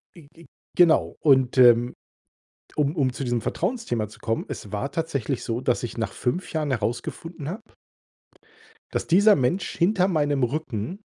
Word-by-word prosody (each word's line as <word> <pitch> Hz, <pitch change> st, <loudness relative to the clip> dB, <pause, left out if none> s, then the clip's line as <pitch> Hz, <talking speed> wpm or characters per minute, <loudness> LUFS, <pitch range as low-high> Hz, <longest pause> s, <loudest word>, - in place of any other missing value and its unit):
Ge 160 Hz, -4 st, -15 dB
ge 165 Hz, -2 st, -16 dB, 0.3 s
genau 170 Hz, -3 st, +4 dB
und, 135 Hz, -3 st, +3 dB
ähm, 120 Hz, -1 st, +6 dB, 0.8 s
um 150 Hz, +2 st, 0 dB
um 135 Hz, -4 st, +1 dB
zu 135 Hz, -, -5 dB
diesem 120 Hz, -2 st, -1 dB
Vertrauensthema 175 Hz, -, -2 dB
zu 105 Hz, -, -16 dB
kommen, 115 Hz, 0 st, -2 dB
es 105 Hz, -, -7 dB
war 115 Hz, +7 st, -3 dB
tatsächlich 145 Hz, -6 st, -2 dB
so, 115 Hz, +1 st, -2 dB
dass 125 Hz, -2 st, 0 dB
ich 120 Hz, -, -5 dB
nach 115 Hz, -4 st, -2 dB
5 175 Hz, +10 st, -2 dB
Jahren 155 Hz, -2 st, -1 dB
herausgefunden 130 Hz, +7 st, -4 dB
habe 220 Hz, +6 st, -9 dB, 1.2 s
dass -, -, -2 dB
dieser 205 Hz, +4 st, +5 dB
Mensch 130 Hz, +9 st, -1 dB
hinter 185 Hz, +1 st, +2 dB
meinem 145 Hz, -6 st, +1 dB
Rücken 130 Hz, -, -3 dB
140 Hz, 155 wpm, -24 LUFS, 120-170 Hz, 1.2 s, ähm